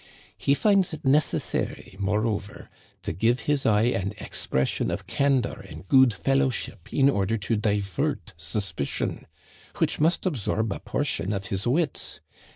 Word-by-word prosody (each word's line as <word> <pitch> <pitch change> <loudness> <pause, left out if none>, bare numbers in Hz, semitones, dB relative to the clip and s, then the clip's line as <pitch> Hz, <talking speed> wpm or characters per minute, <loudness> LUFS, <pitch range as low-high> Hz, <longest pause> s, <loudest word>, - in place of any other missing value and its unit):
He 140 - +2
finds 195 -1 +3
it 150 - -7
necessary, 135 -7 0
moreover, 105 0 -2 0.3
to - - -2
give 115 +8 +2
his 145 -2 +1
eye 105 -1 +4
an 100 -4 0
ex - - -6
pression 65 0 0
of - - -3
candor 140 -3 +1
and - - -10
good 130 +1 +6
fellowship 130 -5 -1
in 135 -1 +4
order 110 -4 +1
to 105 +2 -1
di 105 -1 +1
vert 95 -4 -3
suspicion 85 -1 -3 0.2
— - - -22
which - - +1
must 165 +6 +2
absorb 110 - 0
a - - -6
portion 90 +5 -2
of 100 -1 -3
his 95 +3 -2
wits. 145 +3 0
110 Hz, 155 wpm, -26 LUFS, 100-135 Hz, 0.3 s, good